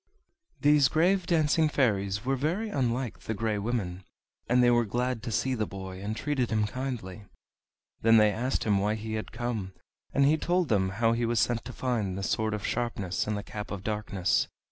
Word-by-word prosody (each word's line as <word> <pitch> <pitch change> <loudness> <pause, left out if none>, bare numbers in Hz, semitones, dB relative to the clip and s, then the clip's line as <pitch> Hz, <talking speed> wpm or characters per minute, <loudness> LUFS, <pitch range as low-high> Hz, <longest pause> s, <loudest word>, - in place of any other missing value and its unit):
These 145 -2 +5
grave 175 +5 +2
dancing 155 -1 +3
fairies 105 -6 0
were 135 +1 +1
very 170 - -1
unlike 125 - -1
the 110 - -4
Grey 110 -1 -1
Women, 100 -5 -3 0.5
and 125 +1 +4
they 120 - +5
were 120 0 +4
glad 120 +2 -1
to 120 - -5
see 130 +4 0
the 110 -4 -1
boy, 95 -1 -7
and 105 +2 -3
treated 140 -5 -1
him 110 -2 +1
kindly. 110 -5 -5 0.8
Then 115 0 +6
they 105 -1 +5
asked 125 +6 -1
him 105 -3 +2
why 105 +2 +1
he 110 0 -5
had 110 0 -4
come; 110 -5 -3 0.4
and 140 - +3
he 150 +3 +4
told 175 +1 0
them 95 -4 +2
how 115 0 +3
he 115 0 0
was 120 -1 +1
sent 120 -1 +1
to 125 - -6
find 110 -8 -2
the 100 - -4
Sword 110 +2 0
of 105 - -5
Sharpness 105 -7 -2
and 105 -1 -1
the 100 - -5
Cap 105 0 -7
of 100 -2 -5
Darkness. 105 -4 0
115 Hz, 200 wpm, -28 LUFS, 105-130 Hz, 0.8 s, Then